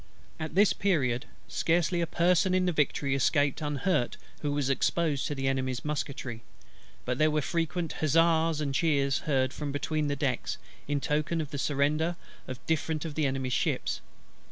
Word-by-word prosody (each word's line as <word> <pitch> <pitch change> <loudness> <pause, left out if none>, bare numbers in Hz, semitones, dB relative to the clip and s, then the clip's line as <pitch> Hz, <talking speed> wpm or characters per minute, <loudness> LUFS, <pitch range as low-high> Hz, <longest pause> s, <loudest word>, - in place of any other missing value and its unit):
At 155 0 -5
this 205 +1 +5
period, 135 -10 +1 0.2
scarcely 170 +1 +1
a 170 - 0
person 180 +3 +3
in 185 0 +2
the 180 - +2
Victory 145 -3 +1
escaped 145 +2 +2
unhurt 150 -2 0 0.2
who 145 - -2
was 145 -2 0
exposed 145 +1 +1
to 145 - -3
the 135 -1 -2
Enemy's 130 -1 -1
musketry; 135 -5 -3 0.6
but 125 0 -1
there 155 0 +5
were 150 -1 0
frequent 165 +1 -1
huzzas 165 +1 +3
and 140 -2 -1
cheers 140 -2 +2
heard 130 -2 +2
from 145 -2 -4
between 150 +2 -1
the 145 - 0
decks, 135 -3 -1 0.3
in 145 -1 0
token 155 +3 0
of 150 -3 -4
the 145 - -4
surrender 150 +5 +1 0.3
of 125 -1 -7
different 160 0 -1
of 160 - -4
the 150 -1 +1
Enemy's 130 -1 -2
ships. - - 0
150 Hz, 170 wpm, -29 LUFS, 135-165 Hz, 0.6 s, this